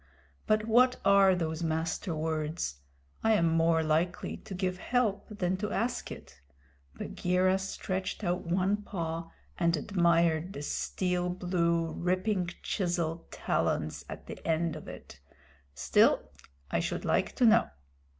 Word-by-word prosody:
But 215 0 +2
what 250 +3 +4
are 195 -1 +6
those 160 -2 -2
Master 165 +2 -1
Words? 155 - -2 0.4
I 225 - +4
am 170 -6 +3
more 165 0 +3
likely 160 +3 0
to 205 -3 -9
give 185 0 -2
help 220 -5 0
than 185 -3 -1
to 210 +2 -3
ask 240 +4 -2
it" 70 - -11 0.5
Bagheera 185 - +1
stretched 190 +1 -4
out 175 0 0
one 185 +4 +1
paw 165 -5 -4 0.3
and 170 -1 +2
admired 170 0 +2
the 145 - -6
steel 180 +3 -1
blue, 170 -2 0
ripping 185 +1 0
chisel 170 -4 -1
talons 80 0 -1
at - - -8
the - - -9
end 165 0 0
of 155 - -9
it - - -10 0.6
"still - - +3 0.4
I - - +1
should - - -3
like - - +1
to 250 - +3
know." 225 0 +5
180 Hz, 135 wpm, -30 LUFS, 165-195 Hz, 0.6 s, are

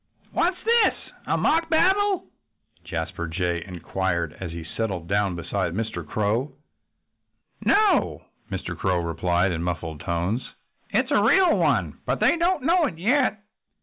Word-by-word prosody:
"What's 360 +1 +1
this? 465 +1 +4 0.3
A - - +1
mock 330 +1 +2
battle?" 380 +4 +3 0.6
Jasper 85 -1 -4
Jay 85 0 -1
inquired 90 -2 -2
as 95 - -4
he 85 0 -6
settled 95 -1 -4
down 100 -1 +1
beside 85 0 -2
Mr. 105 -5 -3
Crow. 110 - -1 1.1
"No!" 405 -7 +3 0.3
Mr. 90 -3 -4
Crow 90 +2 0
replied 85 +2 0
in 85 -1 -2
muffled 85 -3 -3
tones. 85 - -1 0.5
"It - - +2
is - - -11
a - - +4
real 375 -3 +5
one - - +1
but - - 0
they - - +4
don't 340 -3 +1
know 335 +1 +3
it 165 - -7
yet." 215 - +1
95 Hz, 145 wpm, -24 LUFS, -, 1.1 s, real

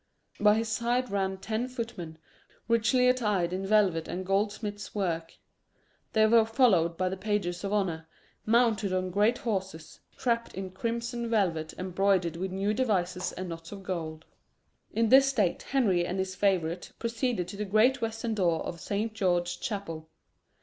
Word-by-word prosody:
By 210 0 +5
his 225 +1 -1
side 240 +2 0
ran 190 -1 -1
ten 220 +5 -2
footmen, 230 -10 -6 0.5
richly 235 +2 +3
attired 210 -9 +1
in 190 +1 -3
velvet 195 -6 +3
and 185 +1 -4
goldsmith's 205 +1 -2
work. 165 -5 -2 0.8
They 220 -1 +5
were 225 +1 +6
followed 220 -8 +3
by 185 - 0
the 190 +1 -3
pages 190 -3 -2
of 200 - -2
honour, 175 -6 -1 0.4
mounted 220 -3 +2
on 185 0 -1
great 210 +6 +3
horses, 190 -7 -4 0.2
trapped 235 -2 -1
in 190 0 -5
crimson 235 +3 -3
velvet 170 -8 0
embroidered 185 -2 +1
with 185 +2 -3
new 195 +3 0
devices 190 -7 0
and 185 0 -5
knots 165 0 -8
of 200 -1 -8
gold. 160 -4 -4 0.7
In 225 0 +1
this 270 +2 +7
state 215 -10 +1
Henry 205 -10 +1
and 180 +2 -3
his 190 0 -2
favourite 180 -3 0
proceeded 230 -5 -1
to 200 - -7
the 210 - -2
great 225 +6 +3
western 225 0 -2
door 175 -6 +1
of 170 - -6
Saint 210 +5 -2
George's 180 -4 0
Chapel. 170 -6 -5
200 Hz, 155 wpm, -29 LUFS, 180-225 Hz, 0.8 s, this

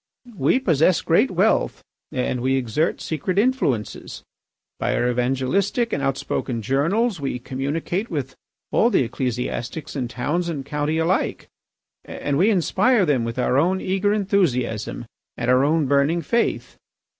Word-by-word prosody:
We 145 - +2
possess 165 - +3
great - - +3
wealth - - +1 0.3
and 125 -1 -1
we 130 +1 +1
exert 135 +5 0
secret 165 +4 -3
influences; 205 - -1 0.6
by - - 0
our 120 - +1
evangelistic 135 - 0
and 140 - -1
outspoken 135 -3 -2
journals 165 - +1
we 135 -2 -2
communicate 145 - -3
with 140 -5 -3 0.4
all 235 - +4
the 185 - +3
ecclesiastics 125 +4 -4
in 130 -3 -2
towns 150 +9 -2
and 145 -5 -4
county 150 +2 -1
alike, 165 +3 0 0.5
and 145 0 -3
we 195 +5 +4
inspire 215 +3 +3
them 140 -7 +1
with 115 +1 -5
our 130 +1 +2
own 185 +5 +2
eager 195 +2 0
enthusiasm 170 - 0 0.3
and 125 +1 0
our 130 +1 +4
own 155 +1 +2
burning 140 +5 +2
faith. 235 +10 -1
145 Hz, 140 wpm, -22 LUFS, 130-185 Hz, 0.6 s, all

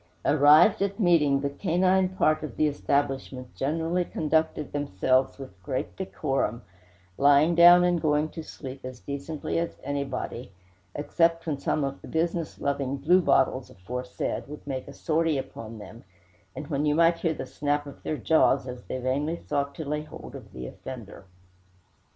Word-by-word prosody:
Arrived 155 +8 +6
at 200 +2 -1
meeting, 150 -8 +3
the 140 - -1
canine 185 +3 +2
part 155 -4 +1
of 155 -6 -7
the 155 - +3
establishment 135 -3 -1
generally 165 +5 -1
conducted 160 -2 -1
themselves 130 -1 +1
with 115 -10 -11
great 130 +8 -4
decorum, 135 -9 -2 0.6
lying 145 +4 +5
down 175 +1 +8
and 175 -2 +2
going 150 -1 +2
to 160 - -8
sleep 135 -3 -9
as 130 -1 -7
decently 140 +4 -4
as 170 - -3
anybody 140 -3 -3
present, - - -20 0.4
except 165 +2 +1
when 150 -4 -2
some 145 +1 0
of 135 0 -4
the - - -11
business 165 0 -2
loving 140 -1 -1
bluebottles 150 -4 +3
aforesaid 125 +7 -5
would 150 +1 -10
make 135 -2 -4
a - - -9
sortie 160 -1 0
upon 115 -4 -7
them, 105 +2 -11 0.6
when 145 0 -1
you 150 - +2
might 165 +1 +4
hear 165 -2 0
the - - -5
snap 145 0 -1
of 140 - -11
their 155 - -3
jaws 140 -5 +3
as 125 -1 -7
they - - -4
vainly 135 +6 -1
sought 140 -3 -3
to 160 - -6
lay 150 +1 -2
hold 155 - -11
of - - -11
the 65 - -7
offender. 115 - -9
145 Hz, 160 wpm, -27 LUFS, 135-165 Hz, 0.6 s, down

